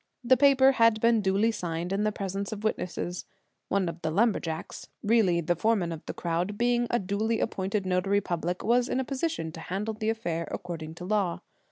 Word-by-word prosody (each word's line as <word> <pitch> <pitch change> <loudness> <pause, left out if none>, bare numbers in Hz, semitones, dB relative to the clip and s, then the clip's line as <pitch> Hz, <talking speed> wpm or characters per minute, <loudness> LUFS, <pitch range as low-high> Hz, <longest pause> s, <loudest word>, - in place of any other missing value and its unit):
The 255 +2 +5
paper 270 0 +6
had 230 -4 +4
been 230 -1 +3
duly 200 +3 +2
signed 175 -3 -3
in 205 +2 0
the 215 - +2
presence 195 0 -4
of 215 -1 -6
witnesses. 180 -4 -3 0.4
One 195 -2 +1
of 170 0 -5
the 160 - -1
lumberjacks, 170 -4 -1 0.2
really 205 -6 +3
the 175 +2 0
foreman 195 -2 +1
of 160 -2 -6
the - - -3
crowd, 175 +4 -2
being 240 +1 +2
a 240 - +2
duly 215 +3 -1
appointed 195 +1 -1
notary 185 +2 +2
public, 175 -2 -3
was 240 +2 +2
in - - 0
a 265 - -1
position 275 - -2
to 165 - -9
handle 200 +6 -3
the 215 0 -2
affair 170 -8 -2
according 165 -4 -6
to 180 - -8
law. 200 -3 0
200 Hz, 195 wpm, -28 LUFS, 175-225 Hz, 0.4 s, paper